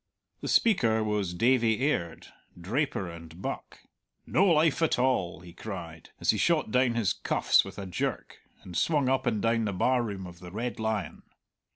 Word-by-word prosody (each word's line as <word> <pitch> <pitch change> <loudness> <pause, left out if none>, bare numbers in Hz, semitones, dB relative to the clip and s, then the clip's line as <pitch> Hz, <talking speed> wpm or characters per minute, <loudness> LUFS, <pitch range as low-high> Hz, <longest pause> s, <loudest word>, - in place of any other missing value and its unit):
The - - -6
speaker 115 - +3
was 105 -4 -1
Davie 115 +2 +3
Aird, 85 - -2 0.3
draper 105 - -1
and 85 0 -10
buck. - - -6 0.4
"No 165 - +3
life 165 -2 +3
at 165 - +2
all," 120 -10 0
he 90 -2 -12
cried, 85 -6 -8
as - - +3
he - - -2
shot - - +2
down 125 -1 +2
his 110 -5 +1
cuffs - - +2
with - - -10
a 100 - -5
jerk, 90 - -4 0.2
and 90 - -10
swung 145 - +2
up 130 -1 +1
and 110 -4 0
down 115 0 +2
the 100 - -2
bar 125 +7 +2
room 100 -5 -5
of 90 -1 -11
the 90 - -10
Red 115 +6 -4
Lion. 110 -5 -2
110 Hz, 180 wpm, -28 LUFS, 90-125 Hz, 0.4 s, speaker